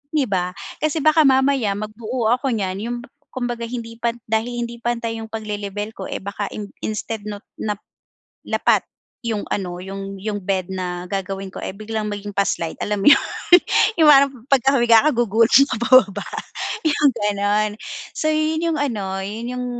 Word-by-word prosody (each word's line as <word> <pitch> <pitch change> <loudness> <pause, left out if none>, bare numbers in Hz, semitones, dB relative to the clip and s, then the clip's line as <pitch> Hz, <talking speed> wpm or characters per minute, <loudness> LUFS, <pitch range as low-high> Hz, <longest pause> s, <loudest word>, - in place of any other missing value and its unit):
'Di 290 - +3
ba, 180 -3 -1 0.2
kasi 310 -1 0
baka 310 -1 +5
mamaya 265 -6 +3
magbuo 220 +2 -2
ako 260 +2 +1
niyan 190 -2 -2
yung 240 0 -3 0.4
kumbaga 240 -2 -3
hindi 230 -1 -6
pa 235 -1 0 0.2
dahil 240 +2 0
hindi 235 0 -8
pantay 235 -1 -2
yung 220 - -6
pagle-lebel 210 -1 -4
ko - - -5
eh - - -4
baka 200 +1 -3
in 205 -2 -6 0.2
instead 220 +1 -3
not 205 0 -6 0.2
na 210 -1 -1 0.7
lapat - - +2 0.4
yung 220 -3 -1
ano 180 -3 -3
yung 195 +1 -7
yung 210 0 -2
bed 190 -1 -1
na 180 -1 -4
gagawin 195 0 -3
ko - - -11
eh, - - -3
biglang 215 +1 -4
maging 205 0 -5
pa-slide 170 -4 0
alam 210 -1 -1
mo - - +1
yun, 280 - +6 0.8
yung 310 - +6
parang 275 -1 +6 0.2
pagka 270 +1 +4
humiga 235 -3 +6
ka - - +4
gugulong 230 +4 +5
ka - - +1
pababa 240 -6 +4 0.6
yung 295 -2 +4
ganon. 205 0 +1 0.4
So 310 - -1
yun 310 +1 +1
yung - - -1
ano, 200 -8 -2
yun 225 +4 -5
yung 250 - -3
220 Hz, 170 wpm, -21 LUFS, 200-245 Hz, 0.8 s, yun